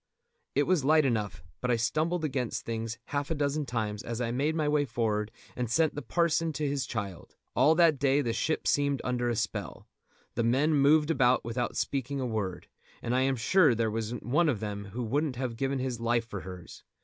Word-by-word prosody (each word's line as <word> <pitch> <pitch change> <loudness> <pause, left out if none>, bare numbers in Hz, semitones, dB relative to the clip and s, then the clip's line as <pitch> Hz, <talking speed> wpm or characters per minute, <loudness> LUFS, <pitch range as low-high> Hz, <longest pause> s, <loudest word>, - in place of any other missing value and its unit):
It - - +4
was 180 -7 +2
light 155 +1 +4
enough, 105 - -1 0.2
but 125 - -1
I 120 - +4
stumbled 155 +9 0
against 130 -5 -2
things 115 0 -3 0.2
half 145 0 -1
a 165 - 0
dozen 145 0 -1
times 105 -3 -2
as 115 0 -5
I 120 -1 -1
made 145 +6 0
my 155 -2 0
way 150 0 +3
forward 110 -4 -1 0.3
and 125 -2 -2
sent 160 +6 +2
the 145 - -5
parson 165 -1 +1
to 150 +1 -1
his 140 -3 -1
child. 100 -6 -5 0.2
All 145 +6 +5
that 165 -4 +4
day 140 0 +3
the 120 -4 -1
ship 155 +7 -1
seemed 140 -2 +2
under 120 -1 0
a 120 - 0
spell. 105 -4 -4 0.5
The 115 - 0
men 135 +7 +3
moved 150 +2 +4
about 125 -6 +3
without 120 +1 -2
speaking 140 0 -2
a 130 - -1
word, 105 -6 -3 0.4
and 120 - -1
I 130 - +3
am 135 0 +2
sure 145 +3 +4
there 115 -1 0
wasn't 115 +1 -4
one 150 +7 +3
of 120 -8 0
them 100 -1 -4
who 110 +6 -5
wouldn't 140 +4 0
have 125 -2 -3
given 135 +3 -1
his 130 -2 -3
life 115 0 +1
for 105 -3 -6
hers. 90 -2 -10
125 Hz, 210 wpm, -29 LUFS, 115-145 Hz, 0.5 s, All